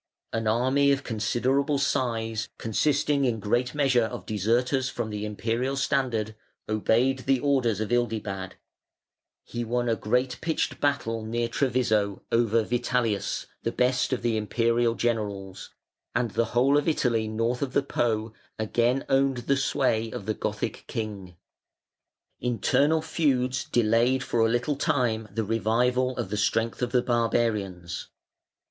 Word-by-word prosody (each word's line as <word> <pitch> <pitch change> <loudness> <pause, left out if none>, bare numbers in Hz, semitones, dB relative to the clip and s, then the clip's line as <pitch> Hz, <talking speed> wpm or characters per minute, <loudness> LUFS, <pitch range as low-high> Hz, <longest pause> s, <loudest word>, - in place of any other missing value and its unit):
An 115 -1 -1
army 130 +5 +3
of 140 - 0
considerable 130 +6 0
size, 115 -5 -1
consisting 140 +5 +1
in 120 -4 +1
great 120 +6 0
measure 135 -5 +3
of 110 - -6
deserters 120 +6 +1
from 120 -4 -4
the 105 0 -3
Imperial 115 +5 -1
standard, 130 -6 0 0.3
obeyed 115 +5 +2
the 130 0 +1
orders 125 -6 +1
of 110 +1 -3
Ildibad; 105 -6 -1 0.9
he 120 0 -4
won 120 +1 -1
a 115 - +2
great 125 +4 0
pitched 160 -1 -1
battle 115 -6 0
near 115 +2 -1
Treviso 115 -6 0
over 115 -1 +3
Vitalius, 120 -3 -1 0.2
the - - -1
best 125 +1 +1
of 125 -2 -1
the 115 -2 +1
Imperial 115 +2 +1
generals, 100 -5 -3 0.5
and 120 -3 0
the 115 +5 +1
whole 140 +4 +5
of 145 - -4
Italy 120 -8 +1
north 115 +3 -1
of 135 -2 -2
the 140 - +2
Po 110 -4 -1 0.2
again 120 +4 +1
owned 135 -1 +2
the 140 - +3
sway 130 -4 +1
of 105 - -7
the 110 - 0
Gothic - - -3
king. 100 -5 -5 1.0
Internal 140 +7 +2
feuds 130 -6 0
delayed 120 +3 +2
for 120 - -1
a 115 0 +4
little 120 +5 0
time 115 -6 0
the 110 +3 -1
revival 120 +4 +1
of 95 - -3
the 105 - -1
strength 115 +3 0
of 125 -1 -1
the 125 -1 +2
barbarians. 110 -7 -1
120 Hz, 140 wpm, -26 LUFS, 110-130 Hz, 1.0 s, whole